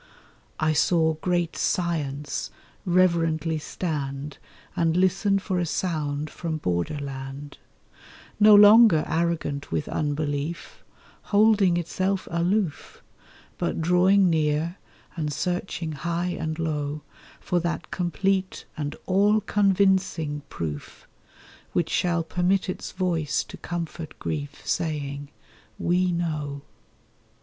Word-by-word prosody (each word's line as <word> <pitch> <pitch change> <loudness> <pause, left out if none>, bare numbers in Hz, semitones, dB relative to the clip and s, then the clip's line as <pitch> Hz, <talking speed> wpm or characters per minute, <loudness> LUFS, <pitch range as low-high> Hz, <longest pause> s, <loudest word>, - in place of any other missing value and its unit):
I 155 0 +2
saw 160 +1 +3
great 175 -2 0
Science 150 -5 -1 0.4
reverently 165 -3 +2
stand 145 -3 -4 0.4
And 165 0 +1
listen 195 +2 +3
for 190 -2 -2
a 175 - 0
sound 155 -4 -2
from 165 -2 -3
Border 90 - -1
land, 140 0 -7 0.8
No 210 0 +8
longer 205 -4 +8
arrogant 160 -4 -1
with 80 -2 -1
unbelief— 145 +1 -3 0.5
Holding 205 -4 +4
itself 185 +3 -1
aloof— 175 0 -1 0.6
But - - -1
drawing 180 +4 +4
near, 160 +1 +1 0.4
and 155 -3 -2
searching 175 +1 -2
high 170 +4 -2
and 160 -1 -3
low 150 -2 -2 0.4
For 180 - 0
that 170 0 -3
complete 185 +2 -1
and 145 -1 -4
all 205 +3 +3
convincing 190 -7 +1
proof 75 -3 -6 0.7
Which 170 - 0
shall 175 -2 +1
permit 180 +3 +1
its 185 - -5
voice 170 -5 0
to - - -11
comfort 170 -2 -6
grief, 145 -2 -5
Saying, 145 -3 -2 0.5
'We 180 +1 +1
know. 150 -5 -3
170 Hz, 105 wpm, -25 LUFS, 150-185 Hz, 0.8 s, No